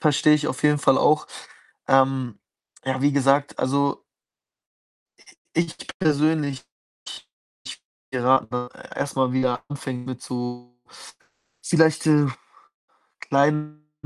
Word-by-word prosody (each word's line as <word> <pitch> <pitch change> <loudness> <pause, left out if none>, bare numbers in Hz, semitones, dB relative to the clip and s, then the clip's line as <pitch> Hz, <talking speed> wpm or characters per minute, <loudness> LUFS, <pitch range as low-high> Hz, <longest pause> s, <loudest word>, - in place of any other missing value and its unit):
verstehe 150 0 +4
ich 150 0 -1
auf - - -5
jeden 150 -1 +3
Fall 135 -1 +3
auch. 150 - +3 0.6
Ähm, 130 -3 +2 0.5
ja, 130 0 -2
wie 145 - +3
gesagt, 140 +1 +2
also 140 +2 0 1.5
ich 170 0 -1 0.2
persönlich, 150 -4 +1 0.4
ich - - -8 0.4
ich - - -8 0.3
würde 125 -2 -2
dir 125 - +2
raten 125 -2 +1 0.3
erst 140 - -3
mal 130 -1 +1
wieder 130 -1 0
anfängt 130 -3 -6
mit 130 -1 -6
so 125 0 -6 0.9
vielleicht, 160 -1 +2
äh, 150 -2 +5 0.9
kleinen 150 +2 0
140 Hz, 115 wpm, -23 LUFS, 130-150 Hz, 1.5 s, äh